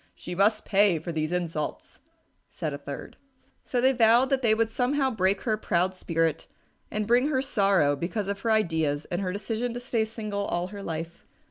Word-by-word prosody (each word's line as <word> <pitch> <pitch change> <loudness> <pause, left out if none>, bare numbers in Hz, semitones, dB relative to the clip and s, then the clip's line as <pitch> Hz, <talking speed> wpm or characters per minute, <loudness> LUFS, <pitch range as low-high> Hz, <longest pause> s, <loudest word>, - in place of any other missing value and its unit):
"She 180 - -7
must 210 +4 +2
pay 200 -3 +4
for 160 +3 -5
these 155 0 -2
insults," 170 -4 -3 0.5
said 155 - -4
a 140 - -5
third. 140 -1 -8 0.5
So 250 - -1
they 260 +2 +4
vowed 240 +1 +4
that 270 -1 +2
they 220 -3 +3
would 225 0 0
somehow 265 +3 +1
break 195 -3 +1
her 220 -3 0
proud 185 -2 0
spirit 165 -3 -1 0.4
and 215 0 -2
bring 240 +5 +3
her 265 -3 0
sorrow 195 - +2
because 195 +7 -3
of 200 0 -3
her 230 - -2
ideas 160 -9 +1
and 175 +2 -1
her 185 -2 -1
decision 225 +4 -3
to - - -3
stay 245 -3 0
single 215 -2 -4
all 175 0 -2
her 200 0 -8
life. 165 -1 -6
200 Hz, 195 wpm, -27 LUFS, 170-230 Hz, 0.5 s, pay